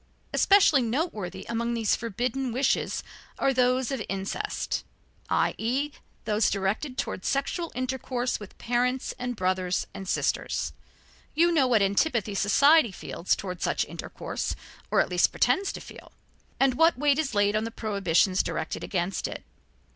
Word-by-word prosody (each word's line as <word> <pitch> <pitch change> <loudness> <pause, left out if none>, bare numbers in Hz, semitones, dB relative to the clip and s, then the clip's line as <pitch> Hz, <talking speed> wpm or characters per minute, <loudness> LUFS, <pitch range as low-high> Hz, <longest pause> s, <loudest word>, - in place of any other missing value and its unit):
Especially 380 -8 +5
noteworthy 220 - -2
among 235 0 -1
these 225 -3 +2
forbidden 245 +3 -2
wishes 265 +3 0 0.3
are 270 - +2
those 255 0 +2
of 265 -4 -2
incest, 195 - -3 0.5
i.e., 265 +6 0 0.3
those 210 0 +2
directed 215 +8 -2
towards 275 -9 -3
sexual 320 +5 -1
intercourse 255 -1 -2
with 205 -2 -11
parents 250 +2 0
and 245 0 -3
brothers 185 -2 0
and 195 - -7
sisters. - - -1 0.6
You 340 +3 +4
know 290 -6 +3
what 230 -5 +4
antipathy 210 +1 +1
society 235 +7 +5
feels 175 -1 -1
toward 180 -3 -6
such - - +1
intercourse, - - -5 0.3
or - - +4
at - - -1
least - - +3
pretends 390 0 +1
to - - -6
feel, - - -13 0.5
and 270 -1 +4
what 325 +4 +4
weight 290 +1 +3
is 275 -7 -1
laid 205 0 +3
on 215 - +1
the - - -3
prohibitions 195 -4 +1
directed - - -4
against 185 0 -2
it. - - -7
240 Hz, 145 wpm, -27 LUFS, 200-270 Hz, 0.6 s, Especially